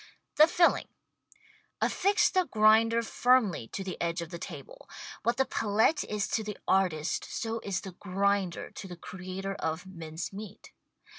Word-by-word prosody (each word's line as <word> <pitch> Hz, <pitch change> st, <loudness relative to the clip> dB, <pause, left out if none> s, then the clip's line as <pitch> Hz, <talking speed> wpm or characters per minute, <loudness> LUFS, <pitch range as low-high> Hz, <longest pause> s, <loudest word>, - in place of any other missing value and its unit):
The 310 Hz, -, +8 dB
Filling 345 Hz, 0 st, +3 dB, 0.9 s
Affix 400 Hz, +3 st, +2 dB
the 370 Hz, -1 st, +2 dB
grinder 225 Hz, +1 st, +4 dB
firmly 225 Hz, -, +2 dB
to 195 Hz, -, -5 dB
the 190 Hz, -1 st, -6 dB
edge 170 Hz, 0 st, -1 dB
of 165 Hz, -, -11 dB
the 170 Hz, -, -6 dB
table. -, -, -9 dB, 0.3 s
What 235 Hz, 0 st, 0 dB
the 265 Hz, -, +3 dB
palette 220 Hz, +5 st, +2 dB
is 210 Hz, -1 st, -2 dB
to 220 Hz, -, 0 dB
the 210 Hz, -1 st, -6 dB
artist 180 Hz, -5 st, +1 dB
so 230 Hz, 0 st, -3 dB
is 200 Hz, -4 st, -3 dB
the 190 Hz, -, -7 dB
grinder 195 Hz, 0 st, -1 dB
to 195 Hz, -, -8 dB
the 175 Hz, -2 st, -9 dB
creator 185 Hz, +2 st, -6 dB
of 160 Hz, -1 st, -3 dB
mince 165 Hz, -2 st, -7 dB
meat. 205 Hz, 0 st, -9 dB
200 Hz, 155 wpm, -29 LUFS, 180-230 Hz, 0.9 s, The